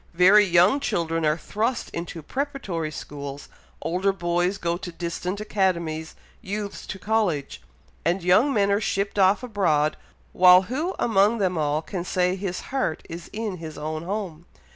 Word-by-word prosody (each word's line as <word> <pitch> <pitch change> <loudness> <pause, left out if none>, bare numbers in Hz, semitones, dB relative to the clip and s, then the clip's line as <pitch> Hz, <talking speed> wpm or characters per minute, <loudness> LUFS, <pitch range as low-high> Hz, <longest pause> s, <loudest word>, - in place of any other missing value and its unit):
very 190 +4 +7
young 180 +8 +4
children 165 - -1
are 150 0 +2
thrust 225 +9 -2
into 170 -1 -6
preparatory 230 - -3
schools 140 -2 -8 0.3
older 180 +5 +1
boys 175 +1 0
go 170 -2 -1
to 180 0 -7
distant 175 +3 -4
academies 170 -7 -1 0.3
youths 200 +1 -5
to 195 - -5
College 190 - -1 0.4
and 170 +3 0
young 200 +11 +4
men 200 -5 +2
are 200 +2 +2
shipped 200 -1 -1
off 195 +5 +4
abroad, 170 -10 +1 0.4
while 180 0 +7
who 300 - -3
among 215 0 +3
them 185 -4 0
all 150 0 0
can 180 -1 -4
say 180 0 +1
his 190 -2 -4
heart 260 -12 -1
is 170 0 -8
in 215 -3 -4
his 160 -2 -8
own 155 +1 -4
home? 175 -3 -5
180 Hz, 155 wpm, -24 LUFS, 165-205 Hz, 0.4 s, very